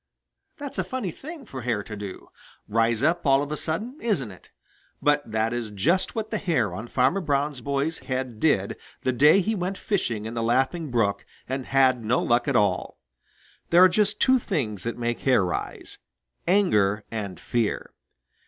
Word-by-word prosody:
That's 285 -1 -6
a - - +2
funny 255 -9 -3
thing 305 - -10
for 130 -10 -7
hair 115 -4 -1
to 105 - -7
do 100 -2 -8 0.4
rise 115 +2 +1
up 170 +3 +2
all 135 -1 +4
of 145 - -6
a - - 0
sudden 210 - -4
isn't 165 - 0
it? 95 - -16 0.5
But 145 -5 +1
that 110 +1 0
is 120 -2 -3
just 150 - 0
what 220 -1 -3
the - - -1
hair 130 - 0
on 110 +6 -6
Farmer 130 +11 +2
Brown's 145 -3 -1
boy's 140 +4 -1
head 130 -4 -4
did 100 -10 +1 0.3
the 130 - +2
day 150 +9 +5
he 220 +4 0
went 190 -1 -2
fishing 115 - -1
in 110 - -5
the 115 - -2
Laughing 135 +7 +1
Brook 115 -5 +1 0.2
and 130 0 -3
had 130 -3 +3
no 120 +3 +2
luck 120 +4 +1
at 140 - +1
all. 100 -5 +1 0.7
There 175 +2 +7
are - - +10
just 205 +3 +1
two 260 0 +5
things 125 - -2
that 115 - -3
make 120 0 -2
hair 130 -8 +3
rise 90 - -5 0.5
anger 105 - +3
and 100 -4 -5
fear. 115 -3 -2
130 Hz, 180 wpm, -25 LUFS, 115-175 Hz, 0.7 s, are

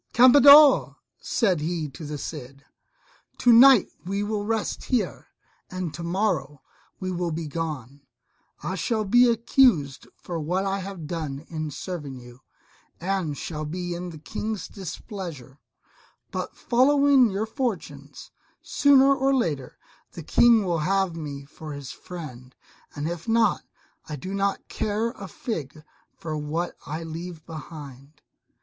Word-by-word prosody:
"Campeador," 280 +3 +8 0.2
said 190 -8 +1
he 160 0 -2
to 140 - -11
the 150 0 -5
Cid, 140 -2 -8 0.7
"to 245 - +5
night 250 -2 +8 0.2
we 195 +3 -2
will 210 0 -2
rest 225 -1 -2
here, 250 -3 -1 0.4
and 185 -4 -4
tomorrow 170 -5 -2 0.4
we 185 0 -3
will 175 -1 -2
be 165 0 -4
gone: 145 -4 -5 0.6
I 175 +5 -2
shall 215 +5 -1
be 245 +5 +5
accused 230 - +2
for 170 -2 -6
what 180 +5 -1
I 195 0 -1
have 190 -4 -7
done 155 -3 -5
in 155 -2 -4
serving 145 -3 -6
you, 120 +1 -14 0.6
and 180 -5 -2
shall 155 -2 -5
be 175 +3 -4
in 175 +1 -5
the 160 - -9
King's 215 +5 -5
displeasure; 170 - -8 0.7
but - - -4
following 275 0 +4
your 200 +2 -2
fortunes, 150 - -5 0.3
sooner 275 -1 +5
or 270 0 +2
later, 150 - -2 0.4
the 170 - -8
King 230 +5 +4
will 170 -2 0
have 190 +1 0
me 145 -4 -6
for 155 +1 -9
his 140 -2 -7
friend, 130 -8 -10 0.4
and 145 +2 -3
if 170 +2 -5
not, 230 0 +3 0.5
I 150 - -4
do 185 +8 -6
not 200 0 -1
care 215 +2 -1
a 200 -5 -9
fig 155 - -6 0.3
for 160 -4 -5
what 155 +3 -3
I 155 +3 -4
leave 165 0 -7
behind." 150 -3 -10
175 Hz, 140 wpm, -25 LUFS, 150-215 Hz, 0.7 s, Campeador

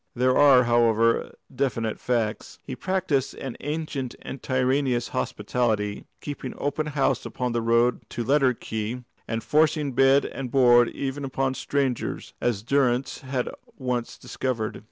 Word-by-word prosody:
There 130 +1 +3
are, 140 -3 +7
however, 115 -1 +2 0.2
definite 115 -4 -1
facts. 115 -4 -2
He 130 - -6
practised 165 -3 -1
an 135 -3 -6
ancient 145 -4 -4
and 135 - -7
tyrannous 130 -1 +1
hospitality, 105 -2 -1 0.2
keeping 140 -3 -6
open 150 +2 -2
house 140 -2 0
upon 125 -1 -3
the 120 0 0
road 115 +1 +2
to 120 - -3
Letterkenny, 125 -3 0 0.2
and 115 0 -3
forcing 155 -1 +2
bed 135 +2 +4
and 135 -2 -5
board 120 -2 +5
even 140 +1 -4
upon 135 0 -1
strangers, 135 -2 -2
as 110 -5 0
Durrance 130 0 +1
had 130 -2 -2 0.3
once 125 -2 -3
discovered. 115 -5 -3
125 Hz, 135 wpm, -25 LUFS, 120-140 Hz, 0.3 s, are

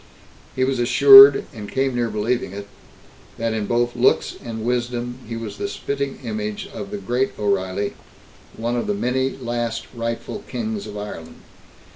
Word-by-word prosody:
He 130 - +1
was 130 -1 0
assured, 135 +3 +9
and 105 -2 -8
came 135 -1 0
near 120 -1 0
believing 110 0 -2
it, 100 0 -7 0.7
that 115 0 -1
in 110 -2 -2
both 120 0 0
looks 120 +1 +2
and 110 -1 -6
wisdom, 120 0 -2
he 115 0 -5
was 115 -3 -7
the 200 - -2
spitting 140 -7 -4
image 215 -2 -4
of 195 - -6
the 205 - -5
Great 130 -7 -2
O'Reilly, 100 -1 -1 0.6
one 120 +2 -2
of 120 - -2
the 205 - 0
many 130 -6 0
last 120 -2 -3
rightful 115 - -4
Kings 220 -3 -4
of 105 - -8
Ireland. 80 -6 -8
120 Hz, 160 wpm, -21 LUFS, 115-135 Hz, 0.7 s, assured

